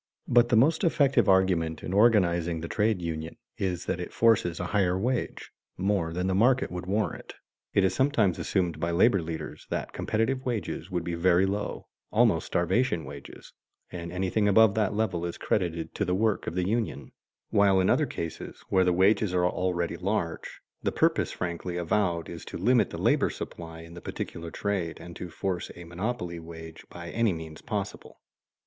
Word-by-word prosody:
But 120 0 +4
the 120 - +3
most 150 +8 +4
effective 140 - +3
argument 90 -4 +2
in 90 - -4
organizing 85 -6 +3
the 85 - -4
trade 105 -2 0
union 80 -1 -4 0.2
is 90 -3 -2
that 90 - -2
it 90 - -5
forces 105 -7 +3
a 90 - -2
higher 95 -3 +2
wage, 120 +5 -2 0.3
more 95 -3 0
than 90 +2 -2
the 95 - +1
market 125 +5 +3
would 90 0 -5
warrant. 105 +2 -2 0.4
It 100 - +5
is 95 -1 +2
sometimes 110 - +2
assumed 90 -4 -1
by 85 - -1
labor 95 +4 +4
leaders 80 0 -6
that - - -3
competitive 125 +4 -1
wages 110 -7 -3
would 90 -3 -2
be 85 - -3
very 90 +2 +3
low, 100 +2 -3 0.3
almost - - +3
starvation 85 - +1
wages, 70 +1 -11 0.4
and 85 -1 -6
anything 95 +3 0
above 105 +1 +6
that 105 -1 0
level 100 -6 0
is 85 -1 -4
credited 85 -4 -1
to - - -1
the 90 -2 0
work 110 +1 0
of - - -3
the 90 0 0
union; 115 +2 -2 0.4
while 100 -2 +4
in 95 - +2
other - - +3
cases 85 -1 -6
where 95 -1 +4
the 90 - +3
wages 95 +1 +3
are 90 0 +3
already 90 -1 -1
large, 90 -3 -3 0.2
the - - 0
purpose - - +1
frankly 90 0 -4
avowed 85 -1 0
is 85 - -8
to - - -6
limit 120 +1 +3
the - - -6
labor - - +2
supply 80 -1 -7
in 85 0 -12
the 85 - -9
particular 85 0 -6
trade 95 -2 -2
and 85 -1 -10
to 90 - -6
force 90 +1 -3
a 85 - -9
monopoly 90 0 -4
wage 80 -1 -10
by 85 -1 -8
any 115 -2 +2
means 80 -1 -8
possible. - - -5
90 Hz, 180 wpm, -28 LUFS, 85-105 Hz, 0.4 s, above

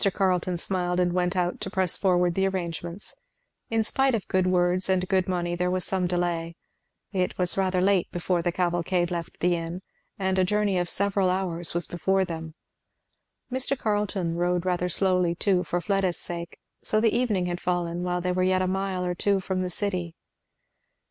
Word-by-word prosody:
Carleton 185 -2 +1
smiled 180 0 -1
and 175 -1 +2
went 180 +1 +1
out 180 -1 -1
to - - -3
press 190 -3 0
forward 180 -2 +2
the 195 +2 +2
arrangements. 175 0 -4 0.6
In 225 -1 +2
spite 265 +3 +2
of 215 - -4
good 185 -1 +2
words 180 +1 +2
and 185 -1 +2
good 190 -1 +2
money 175 -2 -1
there 180 +1 0
was 185 0 -1
some 185 -2 0
delay. 175 -1 -1 0.6
It 185 -3 -1
was 180 -1 +1
rather 185 -1 +1
late 190 -1 +2
before 175 0 0
the 175 +1 0
cavalcade 175 0 0
left 170 -2 -5
the 175 0 +3
inn; 170 +2 -5 0.3
and 190 -1 0
a - - +5
journey 205 0 +1
of 175 -1 -1
several 200 -1 +2
hours 175 -3 -1
was 175 -1 +1
before 190 +2 +1
them. 160 -2 -6 1.0
Mr. 260 +2 0
Carleton 205 -6 -1
rode 175 0 0
rather 180 -1 0
slowly 180 -2 +2
too, 185 0 +2
for 175 +1 -1
Fleda's 195 -1 0
sake, 170 0 -5 0.3
so 215 - +1
the 225 0 +2
evening 220 -7 +1
had 175 0 -3
fallen 175 -1 -1
while 180 0 -1
they 180 0 0
were 185 0 0
yet 185 0 +2
a - - 0
mile 190 -1 -1
or 180 - 0
two 200 +2 +2
from 185 0 -2
the 185 - -2
city. 180 -3 -2
180 Hz, 190 wpm, -26 LUFS, 175-190 Hz, 1.0 s, a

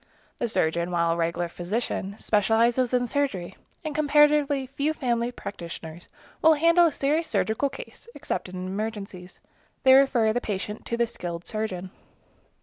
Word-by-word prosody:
The 235 - -1
surgeon, 170 -3 0
while 170 -1 +1
a - - +1
regular 170 +1 -1
physician, 195 +2 -3
specializes 230 +4 +2
in 250 -1 +2
surgery, 235 -10 -2 0.3
and 310 - -3
comparatively 295 -2 +3
few 280 +4 -1
family 240 -4 -1
practitioners 170 -6 -8 0.3
will 320 0 +6
handle 335 +3 +5
a - - 0
serious 300 +4 0
surgical 220 +6 0
case, - - -11
except - - -4
in 185 0 -6
emergencies. 195 -2 -6 0.4
They 260 -1 +7
refer 255 -5 +4
the 245 - -1
patient 210 0 -4
to 235 - -2
the 235 - +3
skilled 175 -6 -6
surgeon. 190 -4 -4
225 Hz, 145 wpm, -26 LUFS, 185-275 Hz, 0.4 s, They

